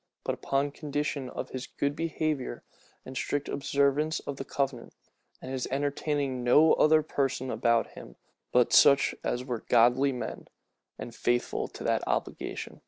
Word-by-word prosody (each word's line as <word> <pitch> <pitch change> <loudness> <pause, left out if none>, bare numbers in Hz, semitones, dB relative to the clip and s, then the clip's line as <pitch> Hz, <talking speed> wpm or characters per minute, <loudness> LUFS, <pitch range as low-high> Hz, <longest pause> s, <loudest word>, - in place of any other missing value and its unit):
but - - -1
upon 140 +1 -1
condition 145 -3 -3
"of - - -6
his 130 0 -5
good 140 0 -2
behavior, 155 -4 -2 0.4
and 130 - -9
strict 145 +2 -2
observance 140 +3 +1
of 140 - -6
the - - -4
covenant, 135 -3 -3 0.4
and 130 - -8
his 130 -1 -2
entertaining 140 -1 -1
no 150 +6 +6
other 155 0 +4
persons 135 -3 -1
about 115 -1 +1
him - - -12 0.4
but 125 -1 +3
such 140 -1 +6
as 125 +1 -2
were 120 -4 -4
godly 125 +4 +4
men, 125 - -6 0.5
and 120 - -7
faithful 120 0 -1
to - - -10
that - - +1
obligation." - - -3
135 Hz, 150 wpm, -28 LUFS, 125-145 Hz, 0.5 s, no